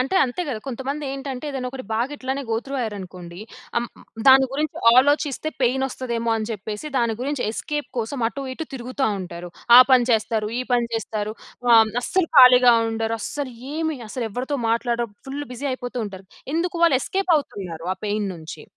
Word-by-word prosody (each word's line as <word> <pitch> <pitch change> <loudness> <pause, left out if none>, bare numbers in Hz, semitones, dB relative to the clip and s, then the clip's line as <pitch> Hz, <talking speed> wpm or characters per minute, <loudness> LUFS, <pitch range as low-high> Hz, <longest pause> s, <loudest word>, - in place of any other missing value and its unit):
అంటే 265 +8 -1
అంతే 260 +7 -3
కదా! 245 -6 -2
కొంతమందేంటంటే 270 +1 -4
ఏదైనా 260 -2 -3
ఒకటి 260 0 -7
బాగా 235 +5 0
ఇట్లానే 265 +1 -3
గో 225 - +2
త్రూ 275 - -6
అయ్యారనుకోండి. 185 -5 -6 0.4
అం 235 - +2 0.4
దాని 265 0 +8
గురించి 300 +2 -2 0.2
ఆలోచిస్తే 290 +2 +3
పెయిన్ 260 +2 +2
వస్తదేమో 235 -3 -3
అని 215 0 -3
చెప్పేసి 210 +5 -6
దాని 235 -2 +1
గురించి 275 0 -2
ఎస్‌కేప్ 295 +6 -4
కోసం, 235 +4 -3
అటు 275 - -7
ఇటు 320 - -5
తిరుగుతా 255 +2 -2
ఉంటారు. 175 -1 -7 0.3
ఆ - - +12
పని 250 -2 +5
చేస్తారు. 220 -1 +1
ఈ - - 0
పని 240 -1 +3
చేస్తారు. 215 -1 -3 0.4
ఆహ్, 225 -2 +7
అస్సలు 365 +5 0
ఖాళీగా 250 -2 +8 0.2
ఉండరు. 225 0 -1
అస్సలు 280 +3 -4 0.2
ఏమి 315 -1 -1
అసలు 235 +1 -3
ఎవరితో 260 +6 -3
మాట్లాడరు. 235 0 0 0.2
ఫుల్ 285 +2 -4
బిజీ 250 +4 -5
అయిపోతూ 250 -1 -5
ఉంటారు. 195 -1 -10 0.3
ఎందుకు? 340 +2 -1
వాళ్ళు 330 -6 +5
ఎస్‌కేప్ 380 +4 0
అవుతున్నారు. 185 - -5
ఆ - - -26
పెయిన్ 205 0 -1
నుంచి. 160 -2 -9
250 Hz, 170 wpm, -23 LUFS, 220-275 Hz, 0.4 s, ఆ